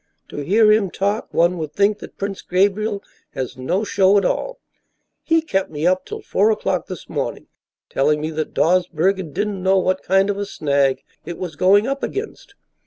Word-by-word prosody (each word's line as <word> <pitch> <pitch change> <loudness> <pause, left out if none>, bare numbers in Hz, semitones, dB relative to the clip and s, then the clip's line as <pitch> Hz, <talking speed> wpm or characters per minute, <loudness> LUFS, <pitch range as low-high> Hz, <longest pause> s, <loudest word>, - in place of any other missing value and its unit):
To - - -9
hear 210 +9 +4
him 215 -3 +3
talk, 200 +5 -2
one 170 +1 +2
would 155 -2 -5
think 205 +4 +2
that - - -11
Prince 200 -1 -4
Gabriel 200 +3 0 0.3
has 130 0 -4
no 170 - -1
show 200 -1 +3
at 195 - +2
all. - - -2 0.6
He 325 -1 +2
kept 195 -11 -1
me 150 +1 -4
up 185 +1 +2
till - - -7
four 205 +3 +2
o'clock 190 -4 -1
this 185 -4 -8
morning - - -4 0.4
telling 150 +2 +1
me 155 +1 -3
that 155 0 -4
Dawsbergen 180 0 +1
didn't 205 +3 -2
know 190 +1 +3
what 185 0 +1
kind 195 +2 +2
of 200 - -5
a 205 - -2
snag 140 -5 0 0.2
it 170 - -7
was 175 -4 -6
going 195 +6 +4
up 275 +2 -2
against. 410 -1 -6
190 Hz, 185 wpm, -20 LUFS, 165-205 Hz, 0.6 s, hear